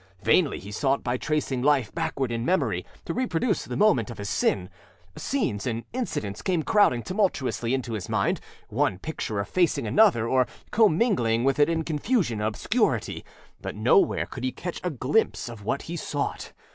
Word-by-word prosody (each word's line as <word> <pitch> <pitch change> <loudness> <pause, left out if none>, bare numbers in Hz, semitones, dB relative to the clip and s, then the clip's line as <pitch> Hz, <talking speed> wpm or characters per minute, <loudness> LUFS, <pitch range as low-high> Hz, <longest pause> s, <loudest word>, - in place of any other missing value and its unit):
Vainly - - +3
he 100 +2 -9
sought 135 +5 0
by 120 0 0
tracing 140 -2 -1
life 135 -5 +2
backward 135 -3 -2
in 115 0 -2
memory, 120 - 0 0.2
to - - -3
reproduce 235 -3 0
the - - -4
moment 140 - +3
of 120 - -8
his 100 0 -5
sin; 90 -2 +1 0.5
scenes 205 - -2
and 115 -1 -2
incidents 110 - -3
came 175 -4 0
crowding 205 - +3
tumultuously 185 - 0
into 125 -3 -4
his 105 -5 -5
mind, - - +1 0.3
one 95 - +1
picture 110 -3 -4
effacing 145 - +1
another, 120 - +4
or 130 0 +3 0.2
commingling 165 - +3
with 135 +2 +1
it 145 - +5
in 165 -1 0
confusion 155 - 0
and 105 - +1
obscurity, 215 - 0 0.4
but - - -5
nowhere 405 -8 +3
could 130 - -8
he 130 - 0
catch 175 +5 -6
a 180 - 0
glimpse 145 - 0
of 115 -3 -9
what 135 +5 -1
he 170 - -6
sought. 145 -3 -3
135 Hz, 170 wpm, -26 LUFS, 115-180 Hz, 0.5 s, it